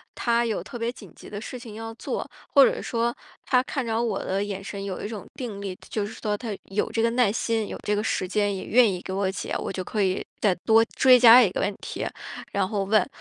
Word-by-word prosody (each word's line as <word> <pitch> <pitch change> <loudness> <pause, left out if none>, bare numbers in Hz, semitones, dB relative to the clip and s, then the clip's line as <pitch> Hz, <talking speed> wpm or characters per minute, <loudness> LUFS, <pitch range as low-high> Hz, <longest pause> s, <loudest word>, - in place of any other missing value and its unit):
他 235 0 +1
有 220 -3 -1
特 245 - -8
别 230 0 -1
紧 200 -9 -13
急 - - -13
的 205 - -5
事 250 - -6
情 230 -4 -10
要 225 +1 -6
做， - - -4 0.2
或 280 - +8
者 - - 0
说 235 0 -1 0.3
他 250 -1 +3
看 270 -1 -3
着 225 0 0
我 225 -5 -1
的 195 +2 -1
眼 195 -1 -5
神 195 0 -6
有 195 -2 -4
一 - - -2
种 215 -3 -7
定 225 -6 -5
力， 195 -2 -4
就 210 -2 -1
是 210 - -7
说 210 -2 -1
他 220 -3 -5
有 195 +2 -2
这 225 - 0
个 230 - +3
耐 240 -4 +3
心， 225 -1 -1
有 - - -6
这 210 - +1
个 210 - -1
时 185 - -1
间， 205 +1 0
也 190 - -5
愿 235 -2 +5
意 180 -1 -4
给 185 - -7
我 195 0 0
解。 190 - -4
我 - - -4
就 185 -1 -4
可 210 +1 -1
以 185 -1 0 0.2
再 205 -3 +4
多 225 0 +6
追 255 -1 +7
加 240 +1 +10
一 210 - +4
个 - - -2
问 200 +1 0
题， - - -4 0.5
然 200 -2 0
后 200 -1 -1
问。 215 +4 +3
215 Hz, 275 characters per minute, -25 LUFS, 200-235 Hz, 0.5 s, 加